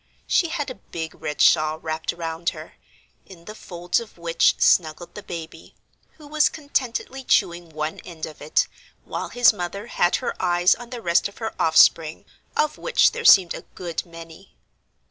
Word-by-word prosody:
She 345 - +2
had 310 -5 -3
a 255 - -12
big 160 -1 -5
red 150 - -5
shawl 155 0 +4
wrapped 160 0 -3
around 165 0 -3
her, - - -10 0.5
in 170 -3 -15
the 215 - -8
folds 175 -3 -2
of 230 -5 -11
which 170 -1 +2
snuggled 170 +1 +2
the 210 - -8
baby, 165 -3 -9 0.4
who 305 - -16
was 300 0 +2
contentedly 270 -3 -3
chewing 175 -7 +1
one 155 0 -4
end 165 -3 -7
of 155 - -12
it, 150 - +1 0.4
while - - -5
his 245 -2 +5
mother 200 +2 -5
had 175 -6 +1
her - - -2
eyes 175 0 +3
on 240 0 -10
the 240 -2 -8
rest 170 0 +2
of 200 - -16
her 220 -1 -4
offspring, 160 0 +4 0.3
of 305 - 0
which - - +3
there 475 - -6
seemed 185 - +7
a - - -7
good 175 -3 -4
many. 165 +2 -13
175 Hz, 175 wpm, -23 LUFS, 165-230 Hz, 0.5 s, seemed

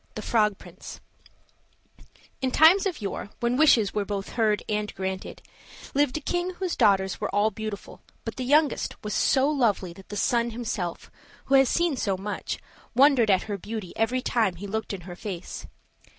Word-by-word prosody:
THE 215 - -5
FROG 210 -3 +2
PRINCE 180 +2 -11 1.4
IN 260 - +1
times 330 +9 +6
of 330 - -5
yore, 200 - -4
when 240 +1 +1
wishes 255 -8 +4
were 210 - 0
both 200 -1 -4
heard 215 -3 +1
and 210 0 -1
granted, 190 0 -5 0.5
lived 285 0 +2
a - - -5
king 350 +4 -2
whose 370 -1 -2
daughters 190 -2 +2
were - - -1
all 210 +2 +2
beautiful 215 -2 -7 0.2
but - - -4
the 255 - -2
youngest 290 +3 +2
was 210 -1 -3
so 270 0 +3
lovely 225 - +1
that 190 +2 -15
the 205 - -5
sun 235 +3 +1
himself, 220 -7 -4 0.3
who 270 - -2
has 270 -2 +6
seen 340 -5 +1
so 195 -5 0
much, 205 +2 -4 0.4
wondered 260 -4 +5
at 190 -2 +4
her 205 -2 -4
beauty 210 -2 -6
every 250 +3 0
time 220 -7 +1
he 190 +4 -8
looked 220 +2 -3
in 195 -3 -5
her 175 0 -9
face. 185 -2 -7
220 Hz, 180 wpm, -26 LUFS, 200-265 Hz, 1.4 s, times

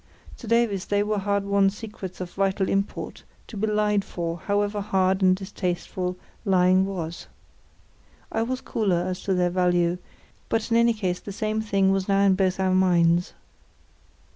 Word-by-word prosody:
To 235 - -10
Davies 230 -4 +1
they 205 0 +1
were 210 0 -1
hard 200 0 0
won 200 -1 +3
secrets 205 -2 -8
of 180 -1 -5
vital 195 0 0
import, 195 +1 -2 0.2
to - - -11
be 210 +2 -1
lied 210 -1 +1
for, 170 -2 -4
however 205 +2 -1
hard 190 -1 +1
and 185 -1 +5
distasteful 185 -1 -3 0.3
lying 185 -1 +3
was. 170 -4 -5 1.0
I 225 - 0
was 255 +3 -2
cooler 185 -6 0
as 185 -1 -4
to 195 - +1
their 180 -1 +1
value, 175 -1 +1 0.5
but 225 +1 -1
in 230 - +4
any 235 0 +4
case 185 -4 -2
the 205 - -8
same 215 +2 -2
thing 195 -3 +2
was 195 -1 0
now 195 -1 +3
in 200 -1 +5
both 190 0 0
our 190 -1 +2
minds. 175 -2 +3
195 Hz, 165 wpm, -25 LUFS, 185-205 Hz, 1.0 s, and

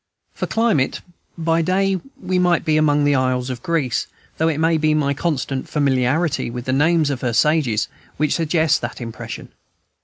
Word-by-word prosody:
For - - -3
climate, 225 - +1 0.4
by 165 0 +1
day, 190 +2 +1 0.2
we 185 0 -1
might 175 -1 +2
be 155 - +2
among 150 -1 +3
the 145 0 +3
isles 130 -1 0
of 120 -2 -6
Greece, 135 -8 -1 0.3
though 160 - +3
it 160 -3 0
may 160 +1 +2
be 155 0 +2
my 140 -2 +1
constant 140 -3 -2
familiarity 140 +1 +1
with 120 +1 -6
the 130 - 0
names 155 +1 +3
of 130 - -4
her 120 -2 -1
sages 125 -4 +2 0.3
which 150 0 +1
suggests 160 -1 +2
that 120 - -6
impression. 115 -2 -7
150 Hz, 175 wpm, -20 LUFS, 130-165 Hz, 0.4 s, among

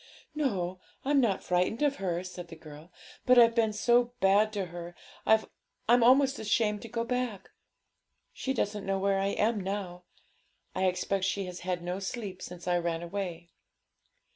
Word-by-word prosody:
'No, 190 - -1 0.3
I'm 285 0 +3
not 210 -6 +1
frightened 180 +8 +1
of 285 -1 +2
her,' 180 -2 -2
said 180 -1 -8
the 165 - -10
girl; 155 +1 -13 0.4
'but 255 0 +6
I've 230 -1 +7
been 225 -2 +2
so 240 +3 +2
bad 200 +3 +4
to 200 -2 -1
her, 175 0 -7 0.3
I'm 220 0 +5 0.6
almost 270 +3 +5
ashamed 210 -1 +1
to 230 - -8
go 230 +1 -2
back. 240 -5 -3 0.8
She 265 - -3
doesn't 205 -6 -2
know 195 0 +1
where 195 0 +1
I 195 - +1
am 210 +2 +1
now. 185 -2 -4 0.7
I 190 - 0
expect 185 +1 0
she 195 0 -1
has 180 -1 -7
had 180 -1 -3
no 180 +2 -3
sleep 195 -2 -5
since 180 0 -9
I 175 0 +2
ran 170 -1 -2
away.' 175 -2 -5
195 Hz, 165 wpm, -29 LUFS, 180-230 Hz, 0.8 s, I've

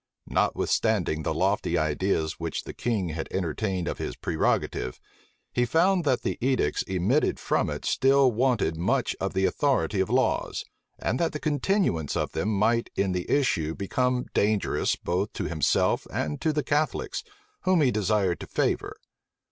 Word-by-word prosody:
Notwithstanding 95 -8 +1
the - - -1
lofty 85 - +1
ideas 80 +1 0
which 85 -1 -3
the - - -8
king 105 -7 -1
had 80 0 -4
entertained 95 +1 -2
of - - -3
his - - -4
prerogative, 80 -5 -1 0.5
he 120 - +2
found 170 +7 +2
that 130 -3 +1
the - - -2
edicts 125 - +1
emitted 95 - +1
from - - 0
it - - -5
still 135 -1 +4
wanted 115 -9 +1
much 120 +8 0
of 95 0 -2
the 95 0 +2
authority 135 -7 +1
of 95 - +1
laws, 130 +2 0 0.3
and 125 - -1
that 170 - 0
the 150 - -3
continuance 150 - 0
of - - -1
them 105 - -1
might 110 +3 +1
in 100 -1 +1
the 90 -1 -3
issue 80 - +1
become 125 +5 0
dangerous 105 -1 +1
both 95 +4 -2
to - - -3
himself 80 -2 +1
and 75 -1 -2
to 160 - +2
the 150 -1 -1
Catholics, 150 +3 -1 0.4
whom 185 -3 +4
he 135 -4 +4
desired 100 -4 +1
to - - -8
favor. - - -1
105 Hz, 160 wpm, -26 LUFS, 90-130 Hz, 0.5 s, still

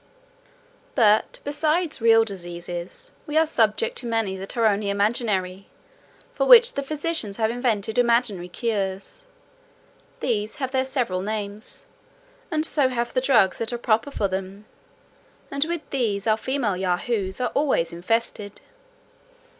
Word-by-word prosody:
"But, 215 -3 +3
besides 305 +1 0
real 225 0 +6
diseases, 175 - -7 0.2
we 300 +1 -1
are 320 - +5
subject 310 - +1
to 240 - -6
many 225 -4 0
that 195 +4 -7
are 230 - +3
only 205 -1 +2
imaginary, 200 -2 0 0.7
for - - 0
which - - +8
the - - -2
physicians 290 -7 -2
have 220 -1 +1
invented 230 -2 -1
imaginary 235 -7 +1
cures; 205 - -3 0.9
these 215 -3 -1
have 265 -2 -3
their 260 0 +1
several 245 -9 -1
names, 210 +1 -5 0.6
and 310 -2 0
so 285 -5 +2
have 240 -1 -2
the 255 - +1
drugs 230 -8 +3
that 230 +1 -2
are 240 - -2
proper 235 +3 +1
for 210 -7 -1
them; 190 +2 -5 0.9
and 280 +1 +1
with 335 -1 -4
these 215 -7 -1
our 220 -1 +4
female 240 -3 -1
Yahoos 190 +2 -1
are 250 - -1
always 270 - +1
infested. 205 +2 -2
225 Hz, 140 wpm, -24 LUFS, 200-270 Hz, 0.9 s, which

